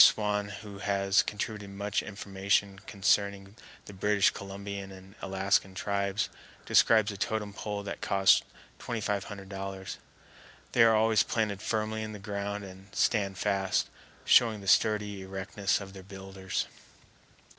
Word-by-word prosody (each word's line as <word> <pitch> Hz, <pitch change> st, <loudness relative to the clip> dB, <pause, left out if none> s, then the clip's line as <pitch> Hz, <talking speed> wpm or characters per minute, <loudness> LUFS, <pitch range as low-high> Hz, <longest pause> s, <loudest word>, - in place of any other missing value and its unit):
Swan, 105 Hz, -1 st, +3 dB
who 100 Hz, -2 st, -9 dB
has 100 Hz, 0 st, +3 dB
contributed 105 Hz, -1 st, -4 dB
much 100 Hz, +1 st, -1 dB
information 100 Hz, -1 st, -1 dB
concerning 100 Hz, 0 st, +1 dB, 0.3 s
the 100 Hz, -, -10 dB
British 100 Hz, +1 st, +3 dB
Columbian 100 Hz, 0 st, -6 dB
and 95 Hz, 0 st, -13 dB
Alaskan 95 Hz, 0 st, +1 dB
tribes, 100 Hz, +1 st, 0 dB, 0.4 s
describes 110 Hz, -2 st, +5 dB
a 100 Hz, -, -7 dB
totem 105 Hz, 0 st, -2 dB
pole 105 Hz, 0 st, -4 dB
that 100 Hz, -, -6 dB
cost 95 Hz, -1 st, +4 dB, 0.4 s
$2500. 100 Hz, -3 st, -4 dB, 0.7 s
They 120 Hz, -, +3 dB
are 115 Hz, -1 st, +7 dB
always 110 Hz, 0 st, +4 dB
planted 105 Hz, -3 st, -1 dB
firmly 110 Hz, 0 st, -1 dB
in 110 Hz, 0 st, -5 dB
the -, -, -6 dB
ground 100 Hz, 0 st, -4 dB
and 95 Hz, 0 st, -11 dB
stand 100 Hz, -5 st, +1 dB
fast, 95 Hz, 0 st, +1 dB, 0.4 s
showing 110 Hz, -4 st, +5 dB
the 95 Hz, -, -10 dB
sturdy 105 Hz, 0 st, +3 dB
erectness 95 Hz, +1 st, -1 dB
of 95 Hz, -1 st, -9 dB
their 95 Hz, -, -9 dB
builders. 95 Hz, 0 st, -4 dB
100 Hz, 130 wpm, -30 LUFS, 95-105 Hz, 0.7 s, are